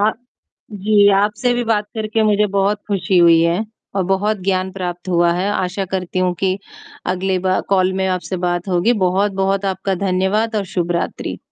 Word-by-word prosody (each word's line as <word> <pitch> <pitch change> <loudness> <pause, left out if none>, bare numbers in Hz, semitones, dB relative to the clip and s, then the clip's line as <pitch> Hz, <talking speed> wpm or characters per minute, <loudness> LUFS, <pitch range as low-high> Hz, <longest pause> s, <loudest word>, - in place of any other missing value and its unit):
आ 210 +1 +4 0.6
जी, 205 0 +3
आपसे 210 +5 +1
भी 240 0 -1
बात 215 -2 +1
करके 220 0 -1
मुझे 210 -1 +3
बहुत 200 +1 +1
ख़ुशी 195 -2 0
हुई 170 -1 +6
है 170 +6 +1 0.3
और 190 - +2
बहुत 210 +3 +1
ज्ञान 190 -1 0
प्राप्त 180 -1 -5
हुआ 170 -1 +3
है। 185 +3 -1
आशा 190 0 -2
करती 185 -1 -2
हूँ 180 -1 +2
कि 190 0 +1 0.5
अगले 185 0 -1
बा 185 0 +1
कॉल 190 -1 +2
में 190 0 -1
आपसे 185 0 -2
बात 175 +2 -2
होगी। 180 +6 +2
बहुत-बहुत 195 +1 0
आपका 190 0 -1
धन्यवाद 195 +4 0
और 200 - 0
शुभ 175 -1 0
रात्रि। 170 - -3
190 Hz, 175 wpm, -18 LUFS, 185-205 Hz, 0.6 s, हुई